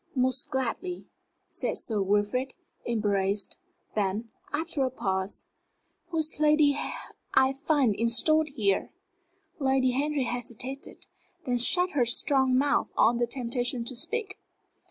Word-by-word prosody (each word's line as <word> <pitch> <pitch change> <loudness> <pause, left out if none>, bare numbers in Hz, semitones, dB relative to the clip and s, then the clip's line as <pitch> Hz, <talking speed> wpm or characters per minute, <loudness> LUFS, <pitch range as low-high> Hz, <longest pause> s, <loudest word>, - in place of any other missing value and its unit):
"Most 255 0 0
gladly," 265 +8 -3 0.4
said - - -3
Sir 215 -3 -1
Wilfrid, 205 +7 0 0.3
embarrassed; 205 -3 0 0.4
then, 210 +2 -1 0.2
after 310 -2 -1
a 260 - +1
pause, 190 -5 -2 0.6
"Who 335 -1 -4
is 315 0 +2
this - - -11
lady 300 -1 +5 0.6
I 265 0 +5
find 275 -4 +2
installed 235 +9 +2
here?" 210 -9 0 0.7
Lady 265 -2 +3
Henry 285 +2 0
hesitated, 245 +2 -6 0.4
then 245 -2 +1
shut 360 +9 +3
her 260 -4 +2
strong 260 +1 +3
mouth 285 +2 +2
on 235 +2 +4
the 240 - +2
temptation 245 -1 -2
to 255 - -1
speak. 400 - -3
255 Hz, 125 wpm, -28 LUFS, 230-285 Hz, 0.7 s, lady